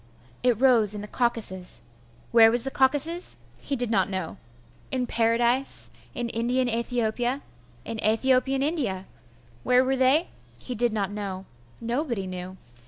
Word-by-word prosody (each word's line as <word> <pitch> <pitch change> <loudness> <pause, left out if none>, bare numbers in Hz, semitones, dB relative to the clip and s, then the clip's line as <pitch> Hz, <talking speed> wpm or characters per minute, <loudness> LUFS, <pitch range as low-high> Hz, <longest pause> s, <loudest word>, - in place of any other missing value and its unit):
It 245 -3 +1
rose 235 -6 +5
in 205 - -5
the 210 - -7
Caucasus. 220 -7 0 0.5
Where 225 -1 +7
was 235 +1 +3
the 270 - -3
Caucasus? 290 +7 +4 0.2
He 280 - -3
did 245 -3 -1
not 195 -4 +1
know. 190 -1 -5 0.5
In 255 -1 -1
Paradise 235 +3 +1 0.2
in 240 -1 -3
Indian 245 +3 -1
Aethiopia 240 +2 -2 0.4
in 225 - -6
Aethiopian 260 +5 +1
India. 250 - -2 0.6
Where 250 - +3
were 265 +1 0
they? 265 +6 +2 0.3
He 250 - -6
did 240 0 0
not 205 -2 -2
know. 195 -2 -6 0.3
Nobody 235 -3 -3
knew. 185 0 -7
235 Hz, 140 wpm, -25 LUFS, 215-260 Hz, 0.6 s, Where